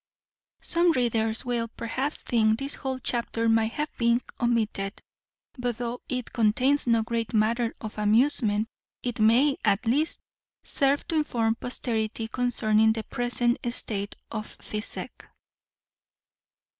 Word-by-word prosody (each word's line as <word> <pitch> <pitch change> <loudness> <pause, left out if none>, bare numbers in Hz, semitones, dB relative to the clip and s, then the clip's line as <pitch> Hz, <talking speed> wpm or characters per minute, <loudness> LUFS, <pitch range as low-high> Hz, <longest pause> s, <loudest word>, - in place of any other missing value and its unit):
Some 340 0 +3
readers 225 -4 0
will, 240 -2 -1
perhaps, 255 +6 0
think 220 -3 +2
this 275 +2 -2
whole 265 -1 -3
chapter 235 -2 -1
might 225 0 +2
have 300 +1 -3
been 235 0 +3 0.2
omitted; 220 -4 0 0.6
but 245 -2 -2
though 240 0 -4
it 250 -2 -3
contains 250 +5 +2
no 230 -1 +3
great 230 -1 -2
matter 230 +2 +1
of 215 -1 -7
amusement, 215 -1 +2 0.4
it 245 -2 -3
may 245 +6 +4
at 200 +4 +2
least 290 +8 +1 0.4
serve 280 0 +1
to 325 - +1
inform 230 -7 +1
posterity 225 -2 -2
concerning 220 -2 +2
the 220 -1 -4
present 240 +1 0
state 205 -4 -1 0.2
of 215 -1 -4
physic. 210 0 -5
235 Hz, 125 wpm, -26 LUFS, 220-250 Hz, 0.6 s, may